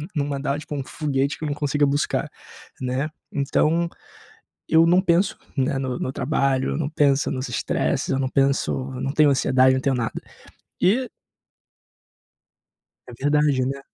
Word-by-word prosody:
não 145 Hz, -2 st, 0 dB
mandar 140 Hz, 0 st, -2 dB
tipo 150 Hz, 0 st, -8 dB
um 140 Hz, -, -2 dB
foguete 140 Hz, 0 st, -2 dB
que -, -, -9 dB
eu -, -, -1 dB
não -, -, -1 dB
consiga 145 Hz, 0 st, +1 dB
buscar, 145 Hz, +1 st, 0 dB, 0.5 s
né? 130 Hz, +4 st, -1 dB, 0.2 s
Então, 160 Hz, +4 st, +1 dB, 0.8 s
eu 165 Hz, +1 st, +5 dB
não 180 Hz, +2 st, +5 dB
penso, 180 Hz, +1 st, +2 dB, 0.2 s
né, 135 Hz, 0 st, 0 dB
no 130 Hz, -2 st, -3 dB
no 130 Hz, -, -3 dB
trabalho, 135 Hz, -2 st, 0 dB
eu -, -, -2 dB
não 155 Hz, -3 st, -1 dB
pensa 145 Hz, -3 st, +2 dB
nos 130 Hz, -2 st, -3 dB
estresses, 115 Hz, -4 st, -1 dB
eu 135 Hz, -, +1 dB
não 130 Hz, -, 0 dB
penso 135 Hz, +1 st, +1 dB, 0.2 s
eu -, -, -5 dB
não 135 Hz, +1 st, -2 dB
tenho 155 Hz, -1 st, +4 dB
ansiedade, 130 Hz, -1 st, +4 dB
não 130 Hz, -, 0 dB
tenho 135 Hz, -1 st, 0 dB
nada. 115 Hz, -2 st, -3 dB, 0.6 s
E 240 Hz, +8 st, +2 dB, 2.0 s
É 125 Hz, -, -11 dB
verdade, 145 Hz, +3 st, +2 dB
né? 140 Hz, +1 st, -3 dB
140 Hz, 165 wpm, -23 LUFS, 130-150 Hz, 2.0 s, eu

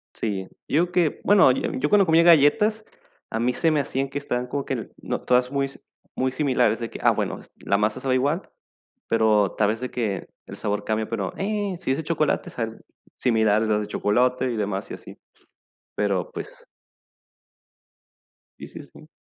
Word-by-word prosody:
Sí, 95 Hz, -4 st, -3 dB, 0.2 s
yo 175 Hz, +4 st, +1 dB
que, 175 Hz, -4 st, +1 dB
bueno, 200 Hz, -8 st, +6 dB
yo 125 Hz, -, -1 dB
yo 140 Hz, +3 st, -1 dB
cuando 200 Hz, +1 st, +4 dB
comía 165 Hz, 0 st, +5 dB
galletas, 175 Hz, +7 st, +4 dB, 0.5 s
a 110 Hz, -, -2 dB
mí 125 Hz, +2 st, +1 dB
se 165 Hz, +4 st, +1 dB
me 150 Hz, -, +2 dB
hacían 135 Hz, -1 st, -2 dB
que 140 Hz, +1 st, -4 dB
estaban 125 Hz, -3 st, -2 dB
como 140 Hz, +2 st, -3 dB
que, 125 Hz, -4 st, -4 dB
no, -, -, -2 dB
todas 125 Hz, 0 st, +2 dB
muy 140 Hz, 0 st, 0 dB
si 135 Hz, -, -14 dB, 0.3 s
muy 130 Hz, 0 st, 0 dB
similares, 130 Hz, -4 st, +1 dB
de 115 Hz, -1 st, -4 dB
que, -, -, -9 dB
ah -, -, +5 dB
bueno, -, -, -2 dB
es -, -, -17 dB
la 100 Hz, -, 0 dB
masa 105 Hz, +3 st, 0 dB
sabe 130 Hz, 0 st, 0 dB
igual, 145 Hz, +8 st, 0 dB, 0.6 s
pero 110 Hz, -3 st, +3 dB
tal 105 Hz, -, +3 dB
vez 110 Hz, +2 st, -1 dB
de 125 Hz, -, -4 dB
que 105 Hz, -6 st, -3 dB, 0.2 s
el -, -, -9 dB
sabor 105 Hz, 0 st, -2 dB
cambia, 110 Hz, 0 st, -1 dB
pero, 105 Hz, -4 st, -3 dB
eh, 205 Hz, -1 st, -1 dB
si 130 Hz, -, -3 dB
es -, -, 0 dB
de 160 Hz, -, -4 dB
chocolate, 155 Hz, -1 st, 0 dB
sabe 115 Hz, -1 st, -4 dB, 0.4 s
similar 110 Hz, -3 st, +2 dB
a -, -, 0 dB
las 105 Hz, -1 st, +1 dB
de 105 Hz, -, -4 dB
chocolate 125 Hz, +5 st, +1 dB
y -, -, -3 dB
demás, 100 Hz, -2 st, -2 dB
y -, -, -4 dB
así. -, -, -12 dB, 0.8 s
Pero, 100 Hz, -4 st, 0 dB
pues -, -, -9 dB, 1.9 s
Sí -, -, -8 dB
sí -, -, -9 dB
sí. -, -, -17 dB
125 Hz, 195 wpm, -24 LUFS, 110-150 Hz, 1.9 s, bueno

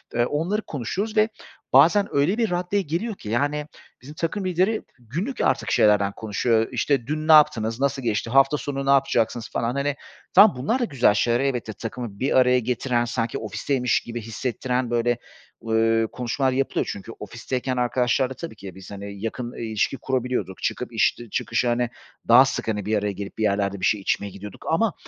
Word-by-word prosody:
Eee, 120 Hz, 0 st, +3 dB
onları 170 Hz, -, -1 dB
konuşuyoruz 195 Hz, -, -4 dB
ve 215 Hz, +1 st, +4 dB, 0.4 s
bazen 170 Hz, +10 st, +6 dB
öyle 150 Hz, +10 st, +2 dB
bir 230 Hz, -3 st, +1 dB
raddeye 180 Hz, +3 st, 0 dB
geliyor 185 Hz, +7 st, -3 dB
ki, 105 Hz, -, -9 dB
yani, 145 Hz, +6 st, 0 dB, 0.3 s
bizim 145 Hz, +4 st, -11 dB
takım 180 Hz, +5 st, -2 dB
lideri 185 Hz, +5 st, +1 dB, 0.2 s
günlük 170 Hz, -, -4 dB
artık 110 Hz, -4 st, +1 dB
şeylerden 100 Hz, -1 st, +4 dB
konuşuyor. 110 Hz, +1 st, +1 dB
Eee, 115 Hz, -, -3 dB
işte 125 Hz, 0 st, 0 dB
dün 155 Hz, +1 st, -3 dB
ne 160 Hz, -, +5 dB
yaptınız, 120 Hz, -7 st, +5 dB
nasıl 140 Hz, 0 st, 0 dB
geçti, 115 Hz, -1 st, -1 dB
hafta 135 Hz, +3 st, +4 dB
sonu 140 Hz, -1 st, -4 dB
ne -, -, 0 dB
yapacaksınız 120 Hz, -4 st, +2 dB
falan, 115 Hz, +1 st, -1 dB
hani, 140 Hz, 0 st, 0 dB, 0.4 s
tamam, 200 Hz, -4 st, +7 dB
bunlar 155 Hz, -, 0 dB
da 245 Hz, -, +1 dB
güzel 130 Hz, -, +3 dB
şeyler, 120 Hz, +3 st, +2 dB
elbette 125 Hz, -5 st, -1 dB
takımı 115 Hz, -2 st, -7 dB
bir 130 Hz, 0 st, +1 dB
araya 125 Hz, 0 st, +5 dB
getiren, 120 Hz, 0 st, 0 dB
sanki 115 Hz, -1 st, -2 dB
ofisteymiş 125 Hz, +4 st, 0 dB
gibi 120 Hz, 0 st, -6 dB
hissettiren, 125 Hz, +2 st, -2 dB
böyle, 120 Hz, 0 st, +1 dB, 0.5 s
ııı, 115 Hz, 0 st, +2 dB
konuşmalar 130 Hz, +2 st, -1 dB
yapılıyor 135 Hz, +1 st, -1 dB
çünkü 100 Hz, +3 st, -8 dB
ofisteyken 125 Hz, +4 st, -4 dB
arkadaşlarla 125 Hz, +1 st, +1 dB
tabii 165 Hz, -4 st, -8 dB
ki 100 Hz, -, -10 dB
de 95 Hz, -, -9 dB
biz, 95 Hz, 0 st, -12 dB
hani, 100 Hz, 0 st, -8 dB
yakın, 120 Hz, +2 st, -3 dB
ııı, -, -, -10 dB
ilişki 110 Hz, +3 st, -1 dB
kurabiliyorduk, 125 Hz, -8 st, -2 dB
çıkıp -, -, -2 dB
iş -, -, +2 dB
dı 120 Hz, -1 st, -10 dB
çıkışı, 120 Hz, +4 st, -1 dB
hani, 120 Hz, 0 st, +1 dB, 0.4 s
daha 120 Hz, +3 st, +8 dB
sık, 130 Hz, -, -3 dB
hani, 105 Hz, -3 st, -2 dB
bir 105 Hz, +1 st, +1 dB
araya 105 Hz, 0 st, -1 dB
gelip 100 Hz, +2 st, -8 dB
bir 110 Hz, -, -1 dB
yerlerde 100 Hz, -1 st, 0 dB
bir -, -, 0 dB
şey 105 Hz, -2 st, +2 dB
içmeye 100 Hz, +1 st, -1 dB
gidiyorduk 100 Hz, +1 st, -10 dB
ama, 195 Hz, +4 st, +2 dB
125 Hz, 190 wpm, -24 LUFS, 110-145 Hz, 0.5 s, daha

